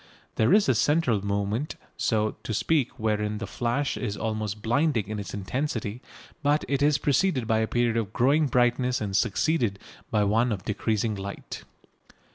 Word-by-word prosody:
There 110 - +2
is 205 0 +5
a 130 - +4
central 125 -4 +2
moment, 100 +8 -1 0.2
so 110 -1 0
to 110 - -3
speak 130 +5 +1
wherein 105 -1 -1
the 115 - -4
flash 125 +4 -1
is 105 -5 -3
almost 110 -2 -3
blinding 120 -3 +1
in 110 -1 -3
its 100 - -6
intensity, 115 +1 -3 0.4
but 145 0 +2
it 140 0 0
is 145 0 +4
preceded 145 -2 +1
by 110 0 +2
a 110 - +1
period 120 -1 +1
of 110 -4 -2
growing 145 +5 +3
brightness 125 0 +2
and 100 -3 -3
succeeded 115 0 +1 0.3
by 105 -1 +2
one 115 +4 +2
of 100 -3 -4
decreasing 110 +1 0
light. 100 0 -7
115 Hz, 165 wpm, -26 LUFS, 105-135 Hz, 0.4 s, is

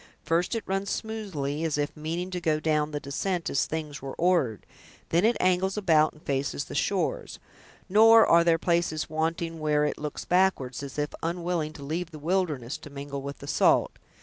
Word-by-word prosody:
First 170 +7 0
it 225 - -2
runs 195 +1 -2
smoothly, 175 -10 -3
as 160 -3 0
if 145 0 -2
meaning 165 +4 -4
to 180 -1 -3
go 155 -2 +1
down 155 -1 +1
the 150 -1 -3
descent 170 +6 -2
as 140 - +1
things 155 -2 -5
were 135 0 -6
ordered; 165 - +1 0.4
then 170 +3 +2
it 235 +1 +3
angles 185 +2 +1
about 160 -6 +4
and 155 - -20
faces 135 - -2
the - - -9
shores; - - -1 0.5
nor 225 +3 +7
are 170 0 +5
there 170 -1 +4
places 170 -3 0
wanting 165 +1 -2
where 150 -1 +2
it 150 - -2
looks 150 0 -5
backward, 180 -9 +2
as 140 -1 -8
if 150 0 -2
unwilling 170 -2 -2
to 145 - -10
leave 165 +4 -3
the 155 - -10
wilderness, 150 -6 -1
to - - -11
mingle 140 0 -6
with 140 +1 -6
the 140 - -10
salt. - - +3
160 Hz, 190 wpm, -27 LUFS, 145-180 Hz, 0.5 s, nor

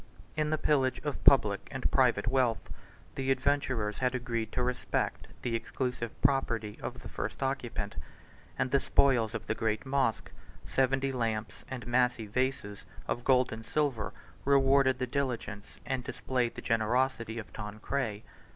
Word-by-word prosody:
In 155 -1 +1
the 155 - +1
pillage 135 -4 +2
of - - -3
public - - +5
and - - -2
private 100 - +3
wealth, 120 -5 +1 0.4
the 135 0 -2
adventurers 130 -6 +1
had 125 0 +1
agreed 115 -3 -2
to 125 - +1
respect 125 0 -1 0.2
the 120 - -1
exclusive 120 0 -3
property 115 -6 +1
of - - -6
the - - -6
first - - -4
occupant; - - -2 0.6
and 130 0 0
the 140 - +5
spoils 120 -5 +3
of 115 - -4
the - - 0
great 110 +2 -1
mosque, 130 -5 0 0.3
seventy 135 +1 +1
lamps 110 -4 -2
and 125 -2 -5
massy 120 -2 +2
vases 105 -2 -2 0.2
of 120 - -2
gold 130 -1 +4
and 110 0 -7
silver, 140 -4 0 0.3
rewarded 135 -1 +4
the 130 - -1
diligence, 125 -6 -3
and 130 0 -2
displayed 125 -2 -1
the - - -7
generosity, 115 +1 +1
of 110 - -7
Tancred. 110 +1 -3
125 Hz, 150 wpm, -31 LUFS, 115-135 Hz, 0.6 s, public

